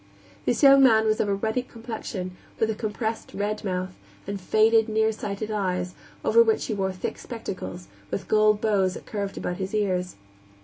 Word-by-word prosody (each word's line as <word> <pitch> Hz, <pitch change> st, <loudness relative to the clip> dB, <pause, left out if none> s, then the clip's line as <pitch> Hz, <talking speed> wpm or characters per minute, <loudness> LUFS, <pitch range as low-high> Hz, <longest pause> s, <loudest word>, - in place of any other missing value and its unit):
This 245 Hz, -, 0 dB
young 275 Hz, 0 st, +9 dB
man 220 Hz, -4 st, +6 dB
was 215 Hz, 0 st, +2 dB
of 205 Hz, -, +1 dB
a 200 Hz, -, +2 dB
ruddy 220 Hz, +5 st, -1 dB
complexion, 225 Hz, -6 st, -6 dB, 0.2 s
with 220 Hz, 0 st, +2 dB
a -, -, -1 dB
compressed, 220 Hz, +1 st, -4 dB
red 210 Hz, +1 st, -2 dB
mouth, 185 Hz, -1 st, -2 dB, 0.3 s
and 200 Hz, 0 st, -4 dB
faded, 220 Hz, +3 st, +4 dB
nearsighted 215 Hz, -1 st, -1 dB
eyes, 180 Hz, -3 st, -1 dB, 0.3 s
over 465 Hz, -, +6 dB
which 445 Hz, -1 st, +2 dB
he 220 Hz, -, -2 dB
wore 190 Hz, -2 st, -1 dB
thick 185 Hz, -, -5 dB
spectacles, 140 Hz, -, -6 dB, 0.2 s
with 195 Hz, -, -4 dB
gold 215 Hz, -1 st, +4 dB
bows 195 Hz, -4 st, +1 dB
that -, -, -9 dB
curved 200 Hz, -2 st, -4 dB
about 175 Hz, -, -3 dB
his 195 Hz, +2 st, -3 dB
ears. 185 Hz, -3 st, 0 dB
210 Hz, 175 wpm, -25 LUFS, 190-220 Hz, 0.3 s, young